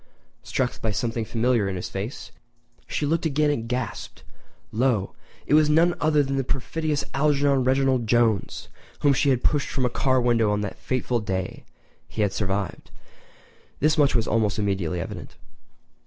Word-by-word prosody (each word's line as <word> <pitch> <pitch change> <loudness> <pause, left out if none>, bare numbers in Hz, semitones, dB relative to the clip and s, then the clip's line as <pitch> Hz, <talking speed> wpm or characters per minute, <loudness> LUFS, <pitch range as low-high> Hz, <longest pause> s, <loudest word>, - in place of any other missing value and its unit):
Struck 125 -2 -2
by 110 - 0
something 115 +2 -1
familiar 115 -2 +1
in 95 - -3
his 90 - -4
face, 100 +7 -6 0.6
she 150 - -2
looked 165 +2 +1
again 150 0 +2
and 115 -5 -3
gasped. 125 -2 -4 0.5
Lo! 110 -4 +1 0.3
it - - 0
was 155 0 +5
none 165 +3 +4
other 150 -1 +3
than 135 0 -2
the 135 - +1
perfidious 150 +4 -2
Algernon 140 -2 +2
Reginald 130 -2 +2
Jones, 115 -3 +1 0.3
whom 145 -1 +4
she 140 +2 +2
had 130 -2 +1
pushed 145 -2 +1
from 130 - -1
a 125 - 0
car 130 -1 +2
window 120 -3 +2
on 105 0 0
that 100 - -5
fateful 125 -2 -1
day! 95 -3 -4 0.4
He 110 - -2
had 100 - 0
survived—this 100 - -4
much 145 -3 +3
was 115 -2 +2
almost 105 -2 +1
immediately 95 -5 -1
evident. - - -7
125 Hz, 160 wpm, -24 LUFS, 105-140 Hz, 0.6 s, was